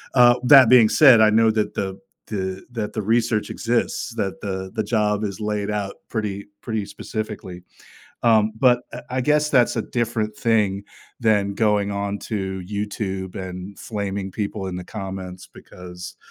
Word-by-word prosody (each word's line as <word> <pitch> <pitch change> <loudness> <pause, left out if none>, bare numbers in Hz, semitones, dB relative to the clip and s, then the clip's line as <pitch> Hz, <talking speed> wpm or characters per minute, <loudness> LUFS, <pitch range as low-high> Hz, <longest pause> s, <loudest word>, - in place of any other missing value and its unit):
Uh, 120 -1 +7
that 130 -2 +8
being 120 -3 +7
said, 130 -7 +7
I 110 - +6
know 110 +1 +4
that 110 -1 -1
the 95 -1 -3 0.3
the 95 -2 -4
that 110 -3 -3
the 110 - -2
research 115 +1 +1
exists, 120 0 -1
that 95 - -3
the 95 -1 -4
the 110 - 0
job 105 -1 0
is 100 -1 -4
laid 105 -1 -2
out 100 -2 -3
pretty 105 -3 -4
pretty 110 -4 -3
specifically. 105 -3 -6 0.6
Um, 110 -2 +4
but, 125 0 +4
uh, - - -6
I 130 +1 -1
guess 150 +2 +2
that's 125 -4 +3
a 115 - 0
different 110 -3 -2
thing 105 -4 +1 0.4
than 105 -3 +2
going 105 -2 +1
on 100 0 -3
to 95 -3 -3
YouTube 100 -2 -4
and 95 +1 -7
flaming 100 -3 -4
people 100 0 -4
in 90 -1 -4
the 90 - -6
comments 95 -3 -7
because 90 0 -11
105 Hz, 160 wpm, -22 LUFS, 95-115 Hz, 0.6 s, that